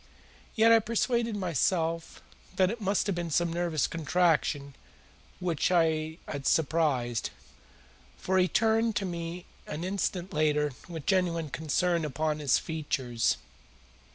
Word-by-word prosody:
Yet 225 +1 +5
I 230 - +8
persuaded 230 +1 0
myself 170 -2 -1 0.3
that 185 0 +3
it 230 0 -6
must 200 0 +1
have 200 -3 -1
been 175 -1 -3
some 170 +2 +1
nervous 170 -4 0
contraction 155 -4 0 0.6
which 175 -5 0
I 160 -2 +1
had 140 -3 -4
surprised, 140 -7 +1 0.9
for 190 0 +1
he 185 - +4
turned 225 +2 +2
to 195 - 0
me 170 0 -5 0.2
an 155 +2 -5
instant 185 -1 -2
later 150 -1 +2 0.2
with 160 -4 -7
genuine 170 -5 +1
concern 165 +3 0
upon 155 +1 -1
his 145 -4 +3
features. 130 -7 -1
165 Hz, 125 wpm, -29 LUFS, 155-185 Hz, 0.9 s, I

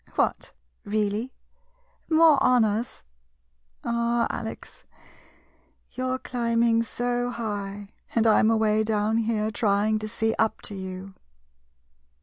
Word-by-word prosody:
] - - -26
What - - 0 0.2
— - - -46
really? 215 +4 -1 0.8
More 320 -2 +5
honors? 230 -2 +1 0.8
Ah— 235 0 +1
Alex, - - -7 1.1
you're 255 0 -2
climbing 235 -2 +1
so 245 +1 -2
high, 205 -3 -5 0.2
and 230 -1 +3
I'm 220 0 +5
away 220 -1 +2
down 215 0 0
here, 220 -1 0
trying 210 0 +1
to 215 - -4
see 225 0 -1
up 220 -1 +1
to - - -5
you. 190 0 -7
225 Hz, 115 wpm, -25 LUFS, 210-235 Hz, 1.1 s, More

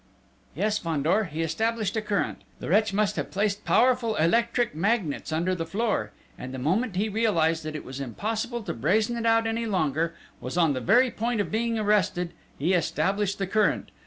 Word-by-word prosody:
"Yes, 210 +5 0
Fandor, 165 +6 +1
he 160 -1 -3
established 215 +5 -1
a 220 - 0
current!... 210 -2 -1 0.2
The - - -6
wretch 210 +3 +3
must 210 0 0
have - - -2
placed 205 +1 -1
powerful 245 -3 +3
electric 235 +7 +2
magnets 175 -3 -1
under 170 +4 0
the 175 -2 -2
floor... 195 - -1 0.3
and 130 - -6
the 130 - -5
moment 185 - 0
he 205 +4 +1
realised 180 -7 +1
that 155 0 -4
it 155 - -6
was 130 +1 -7
impossible 220 - -3
to - - -3
brazen 210 - +1
it 230 -1 -1
out 225 0 +4
any 225 +1 -1
longer 165 -4 0 0.2
was 130 +7 -5
on 165 -4 +4
the 130 - -3
very 245 - +4
point 230 0 -1
of 200 -5 -1
being 230 +1 0
arrested 205 -5 +1 0.2
he 165 +7 +1
established 190 +4 0
the 195 - -1
current 210 +3 +1
200 Hz, 190 wpm, -26 LUFS, 165-225 Hz, 0.3 s, out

